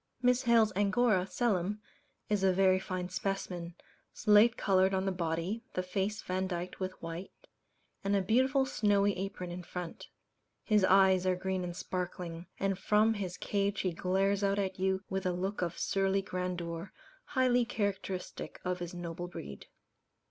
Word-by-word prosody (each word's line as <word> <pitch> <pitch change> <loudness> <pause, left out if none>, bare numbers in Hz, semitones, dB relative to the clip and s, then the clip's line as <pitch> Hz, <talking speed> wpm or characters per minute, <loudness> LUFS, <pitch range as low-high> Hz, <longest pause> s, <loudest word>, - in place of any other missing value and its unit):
Miss 250 0 +4
Hales's 230 -4 +4
Angora, 205 -1 +2
"Selim," 205 -3 0 0.5
is 205 -2 0
a 190 - +5
very 185 0 +4
fine 185 -1 -4
specimen 180 -4 -3 0.4
slate 215 +3 +5
coloured 190 0 +3
on 190 0 0
the 195 - +1
body, 175 +5 -2
the 185 - 0
face 200 +3 -2
vandyked 185 -1 -3
with 185 -1 -4
white, 165 +3 -5 0.7
and 200 +1 +1
a 200 - +3
beautiful 260 +6 +3
snowy 205 -5 +2
apron 185 -2 -5
in 180 +1 -5
front. 175 -1 -7 0.6
His 210 -3 +3
eyes 190 -1 +5
are 185 - +3
green 185 0 -2
and 175 -1 -4
sparkling; 175 -2 -4
and 195 -1 0
from 215 +3 +3
his 190 -4 -4
cage 200 0 0
he 185 -2 -1
glares 195 +3 +1
out 200 0 +2
at 190 -2 -2
you 190 0 +1
with 190 -1 -2
a 180 - +1
look 190 +3 -2
of 170 -1 -2
surly 195 0 +1
grandeur, 180 -1 -4 0.3
highly 255 -2 +3
characteristic 200 -4 -3
of 180 0 -1
his 175 0 -6
noble 175 0 -5
breed. 70 - -9
190 Hz, 155 wpm, -32 LUFS, 180-205 Hz, 0.7 s, a